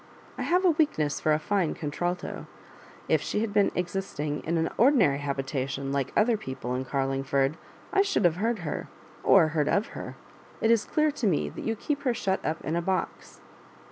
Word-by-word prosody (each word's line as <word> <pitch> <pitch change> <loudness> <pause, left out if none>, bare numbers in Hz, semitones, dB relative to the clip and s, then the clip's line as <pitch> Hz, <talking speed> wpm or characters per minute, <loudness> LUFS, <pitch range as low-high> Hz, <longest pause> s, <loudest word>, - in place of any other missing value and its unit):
I - - -6
have 360 +2 +2
a 355 - +6
weakness 285 - +1
for 155 - +2
a 150 - +4
fine 180 +1 0
contralto, 175 +3 -3 0.6
if - - +3
she 210 - -1
had 220 -2 -2
been 205 -1 +3
existing 175 -5 -3
in 170 +1 0
an 160 0 +1
ordinary 220 - +4
habitation 135 -1 -3
like 140 -2 -1
other 225 +1 +4
people 130 -8 -5
in 130 +1 -2
Carling 135 0 -1
ford, 135 +1 +1 0.4
I 395 - +5
should 395 - +1
have 170 -1 +3
heard 220 -3 -1
her, 145 - -3 0.4
or 155 - +6
heard 150 -2 0
of 205 +2 +1
her. - - -7 0.4
It 225 - +3
is 230 -3 +3
clear 305 0 +2
to 265 -6 -1
me 170 -6 +1
that - - -8
you 225 - 0
keep 285 +6 -2
her 255 -4 0
shut 190 -3 -1
up 160 -1 -3
in 155 +4 -1
a 170 - +1
box." 185 0 -3
170 Hz, 200 wpm, -27 LUFS, 145-225 Hz, 0.6 s, a